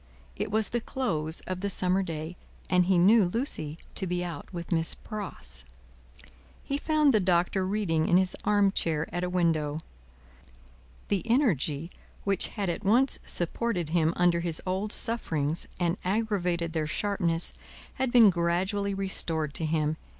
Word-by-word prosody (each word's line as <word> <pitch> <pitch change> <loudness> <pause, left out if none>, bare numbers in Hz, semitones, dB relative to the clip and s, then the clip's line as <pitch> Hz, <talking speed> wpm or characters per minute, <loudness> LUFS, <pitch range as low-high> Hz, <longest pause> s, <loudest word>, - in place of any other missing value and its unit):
It - - -3
was 215 +1 +1
the 240 - -1
close 165 - -2
of 185 -1 -5
the 200 - -1
summer 185 0 +2
day, 165 -1 -5 0.4
and 180 -1 +4
he 190 -1 +4
knew 205 +5 +6
Lucie 175 - -2 0.2
to 190 - -3
be 175 0 -1
out 165 -5 -7
with 170 -1 -7
Miss 165 -1 +1
Pross. 75 - -4 1.0
He 280 +1 -2
found 305 -3 +3
the 215 - +4
Doctor 185 +1 +1
reading 185 -6 0
in 175 - +5
his 185 0 +2
arm 205 -1 +3
chair 160 -5 0
at 175 0 -2
a 180 - -1
window. 160 -4 +1 1.3
The 200 -3 +1
energy 165 - +1 0.4
which 195 -2 +2
had 205 -3 -4
at 175 +4 -3
once 240 +7 +4
supported 175 -1 -2
him 165 -1 +2
under 175 -1 +3
his 170 -2 +1
old 190 +3 -2
sufferings 165 -11 0
and 175 +1 +1
aggravated 180 -5 0
their 155 -2 -1
sharpness, 175 -2 -1 0.4
had 260 -1 -1
been 230 -5 +7
gradually 190 +4 0
restored 165 -6 -1
to 160 - -1
him. 155 0 0
180 Hz, 155 wpm, -28 LUFS, 165-205 Hz, 1.3 s, been